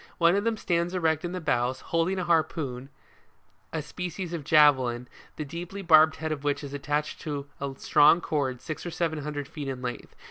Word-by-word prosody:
One 170 +1 +4
of 200 - +1
them 230 -1 +1
stands 175 -2 -1
erect 160 -3 +1
in 175 - -3
the 185 - -3
bows, 130 -5 0
holding 165 +3 0
a 185 - -1
harpoon, 150 -6 0 0.8
a 160 -2 -3
species 180 +2 -5
of 165 -3 -4
javelin, 130 -5 +4 0.3
the 150 - -4
deeply 175 +6 -7
barbed 160 -2 +6
head 160 0 -4
of 150 -2 -4
which 145 0 -1
is 140 -1 -7
attached 145 +1 -2
to 145 -3 -4
a 140 0 -3
strong 150 +3 +5
cord, 140 -7 -2
six 155 -2 -6
or 175 - -4
seven 165 -2 -2
hundred 145 -1 -4
feet 145 -1 -7
in 130 -1 -5
length. 125 -1 -6
155 Hz, 200 wpm, -27 LUFS, 140-170 Hz, 0.8 s, barbed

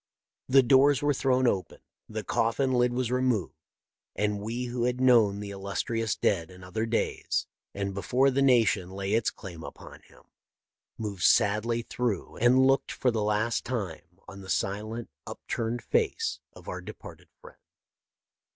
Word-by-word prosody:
The 135 +1 +6
doors 135 +3 +4
were 145 0 +3
thrown 130 -1 +1
open, 95 -6 0 0.3
the - - -4
coffin 130 +4 0
lid 125 0 +3
was 125 -1 -1
removed, 125 -6 0 0.6
and 105 -1 0
we 115 +4 -3
who 120 0 -2
had 125 0 -1
known 115 -6 +4
the 100 -1 -6
illus 100 0 -3
trious 115 -3 -2
dead 85 -5 +1
in 90 0 -13
other 110 +5 -3
days, 115 0 -1 0.3
and 100 0 -3
before 125 +8 +2
the 135 +1 +1
nation 115 -8 +3
lay 95 +1 -3
its 115 0 +2
claim 90 -5 -10
upon - - -11
him, - - -21 0.7
moved 105 -4 -5
sadly 110 +5 +3
through 115 -5 -3
and 125 +3 +5
looked 135 +1 +2
for 125 - +1
the 110 -2 -1
last 105 +2 0
time 90 -8 -5
on 100 - -10
the 95 - -11
silent, 110 +5 -2 0.2
upturned 115 +1 -4
face 455 -1 0
of - - -15
our - - -5
departed - - -11
friend. 485 0 -15
115 Hz, 160 wpm, -28 LUFS, 100-125 Hz, 0.7 s, The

